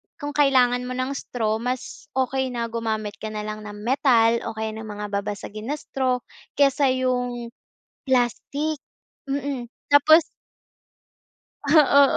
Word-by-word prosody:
kung 290 -1 -5
kailangan 255 -4 +3
mo 255 - -4
ng 255 +1 -1
straw 220 -5 -2
mas 250 +2 -4
okey 265 0 0
na 235 -2 -3
gumamit 220 -2 -3
ka 220 - -5
nalang 215 0 -5
ng 210 -1 -8
metal 235 -2 +4
o 225 - -5
kaya 220 0 -3
ng 220 0 -7
mga 210 0 -6
babasagin 210 +1 -6
na 290 - -1
straw 260 -3 -1 0.4
kaysa 280 0 +4
yung 250 -2 -1 0.6
plastic, 275 +4 0 0.5
mm. 275 -3 -3 0.2
Tapos 310 +3 +7 1.4
Ah, 285 -1 +6
250 Hz, 130 wpm, -24 LUFS, 220-275 Hz, 1.4 s, Tapos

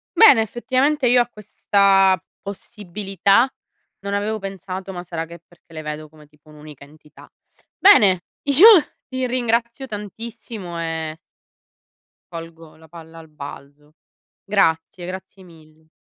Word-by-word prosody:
Bene, 350 - +7
effettivamente 255 +5 0
io 245 0 +5
a 240 - -1
questa 195 -4 +2 0.2
possibilità 200 +2 0 0.5
non 200 0 -5
avevo 210 +2 -2
pensato, 195 -1 -7
ma 175 -2 -7
sarà 165 -2 -5
che 170 +1 -12
perché 175 -1 -25
le 155 - -6
vedo 150 0 -7
come 150 -1 -19
tipo 150 +1 -25
un'unica 150 -2 -13
entità. 150 +1 -18 0.5
Bene, 210 - +6 0.2
io 285 +8 +6 0.4
ti 260 -1 -2
ringrazio 240 +1 -1
tantissimo 210 -4 -8
e 160 -1 -4 1.2
colgo 165 -1 -10
la 160 0 -18
palla 165 0 -13
al 160 - -14
balzo. 145 0 -12 0.5
Grazie. 175 -3 0
Grazie 190 +1 -9
mille. 160 -2 -20
190 Hz, 125 wpm, -21 LUFS, 160-220 Hz, 1.2 s, Bene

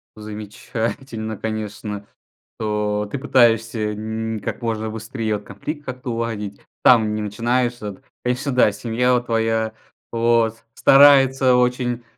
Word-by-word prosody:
Замечательно 110 +2 -5
конечно 105 -1 -5 0.5
что 105 -1 -1
ты - - -2
пытаешься 115 -5 +2
нь 110 +1 -3
как 100 - -5
можно 110 -2 -2
быстрее 110 0 -3
вот - - -15
конфликт 145 +10 -6
как-то 125 -1 -5
уладить 115 -3 -3 0.2
там 110 -4 +5
не 110 - -2
начинаешь 120 +4 0
это 105 -4 -8 0.2
конечно 125 +3 -1
да, 125 -4 +5
и - - -6
семья 120 +4 0
вот 120 -1 +1
твоя 110 -1 0 0.4
вот 115 -1 +1
старается 135 -2 +6
очень. 125 -1 +1
115 Hz, 130 wpm, -21 LUFS, 110-125 Hz, 0.5 s, старается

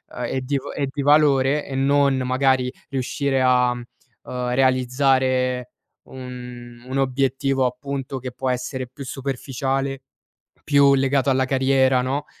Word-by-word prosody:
uhm, - - -4
e 130 - -2
di 140 +2 -2
va 135 - -6
e 140 -2 -2
di 140 - -4
valore 145 -1 +3
e 135 - -6
non 140 0 +3
magari 130 0 +1 0.2
riuscire 135 0 -1
a, 125 -1 +3
mhmm, 120 - -8 0.4
uhm, 125 -1 -3
realizzare 130 -1 +1 0.4
un 125 -2 -9
un 130 - -3
obiettivo 135 0 0
appunto 135 +1 -4
che 125 0 -6
può 130 +2 -3
essere 125 0 -3
più 140 +3 -10
superficiale, 135 0 -3 0.6
più 140 -1 +5
legato 135 0 +1
alla 130 0 +2
carriera, 130 -1 +2
no, 135 +3 -2
130 Hz, 140 wpm, -22 LUFS, 125-135 Hz, 0.6 s, più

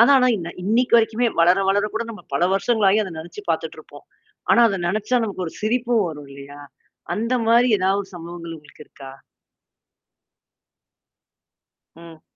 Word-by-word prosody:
ஆனா 235 - +6
ஆனா, 255 -1 +3
இன்ன 170 -3 -6 0.2
இன்னைக்கு 235 +4 +3
வரைக்குமே 230 +1 +1
வளர 175 +2 +5
வளரக் 205 +2 0
கூட 225 +1 -2
நம்ப 215 - -11
பல 140 - 0
வருஷங்களாயும் 210 0 +2
அத 190 - -7
நெனச்சு 175 - -9
பாத்துட்டுருப்போம். - - -5 0.5
ஆனா - - +5
அதை 195 -3 -2
நெனச்சா, 215 +6 0
நமக்கு 195 -4 -4
ஒரு 160 - -8
சிரிப்பும் 235 0 +1
வரும் 150 -3 -9
இல்லையா? 140 +1 -11 0.5
அந்த 230 +4 -1
மாரி 240 +2 +5
ஏதாவது 195 +1 0
சம்பவங்கள் 170 -1 -8
உங்களுக்கு 150 0 -16
இருக்கா? 135 -1 -12 2.9
ம். 165 -1 -14
200 Hz, 140 wpm, -21 LUFS, 170-230 Hz, 2.9 s, ஆனா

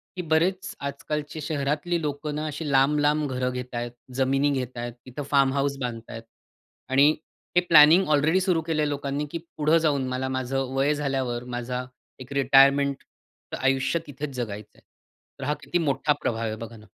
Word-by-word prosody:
की 180 - -3
बरेच 180 +4 0
आजकालची 150 +2 -4
शहरातली 150 +3 -1
लोकं 150 0 -3
ना, 155 +1 -3
अशी 150 0 -4
लांब, 135 +2 +4
लांब 150 -1 +1
घर 125 0 -1
घेतायेत. 125 -1 -4 0.2
जमिनी 135 +2 +2
घेतायत, 120 -3 -3
तिथं 130 +3 -6
फार्म 135 -1 +4
हाउस 140 0 0
बांधतायत. 115 -1 -5 0.7
आणि 140 +3 +5 0.5
हे 180 - +6
प्लॅनिंग 160 +4 +7
ऑलरेडी 155 +5 +3
सुरू 180 -4 +1
केलं 155 -2 0
आहे 150 - +1
लोकांनी, 145 +1 -2
की 170 - -3 0.2
पुढं 155 +2 +4
जाऊन 145 -5 +1
मला 130 +1 -2
माझं 130 0 -2
वय 140 +3 +2
झाल्यावर 135 -4 -2
माझा 125 +1 -3 0.3
एक 130 +2 -9
रिटायरमेंटचं 140 +1 +2
आयुष्य 135 +4 +2
तिथेच 140 -1 -6
जगायचं 105 -4 -5
आहे. - - -22 0.6
तर - - -6
हा 150 - +1
किती 160 +5 -1
मोठा 145 -2 +1
प्रभाव 115 0 -1
आहे? 110 0 -2
बघा 115 +1 -9
ना. 105 - -15
140 Hz, 165 wpm, -25 LUFS, 130-150 Hz, 0.7 s, प्लॅनिंग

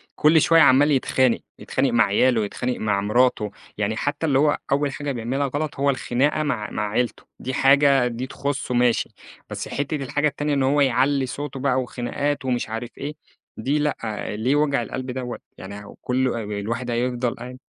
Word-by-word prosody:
كل 155 +1 +5
شويّة 165 +2 +5
عمّال 140 +1 +6
يتخانق، 130 -2 +2 0.2
يتخانق - - 0
مع - - +5
عياله، 120 -4 +2
يتخانق 125 +4 -3
مع 105 -2 0
مراته، 105 0 +2 0.3
يعني 105 +1 -1
حتّى 145 +5 -2
اللي 135 -4 +3
هو 145 0 +3
أوّل 140 +1 +2
حاجة 145 +1 -4
بيعملها 130 +3 -1
غلط 145 +2 -3
هو 140 0 +3
الخناقة 140 +3 +1
مع 115 -8 -2
مع 105 - -2
عيلته، 120 +3 -1 0.2
دي 130 - -4
حاجة 135 -1 +4
دي 120 +2 -4
تخصه 140 -1 -3
ماشي. 120 -1 +2 0.4
بس - - -5
حتّة 145 +2 -2
الحاجة 145 +1 0
التانية 150 0 -2
إن 140 -1 +1
هو 140 +2 +3
يعلّي 135 +1 +2
صوته 140 +1 -5
بقى 130 -1 +1
وخناقات 130 +3 -3
ومش 125 -3 -1
عارف 115 +2 -4
إيه، 145 +2 -5 0.4
دي 135 +7 0
لأ، 150 0 0 0.4
ليه 120 +7 +1
وجع 145 -3 +2
القلب 130 +2 -5
دوّة 125 -1 -5 0.2
يعني 100 +2 -9
هو - - -12
كلّه 125 -2 0
ال 105 0 -5
الواحد 115 +4 -3
هيفضل 120 0 -1
قاعد 125 +1 -9
130 Hz, 185 wpm, -23 LUFS, 120-145 Hz, 0.4 s, عمّال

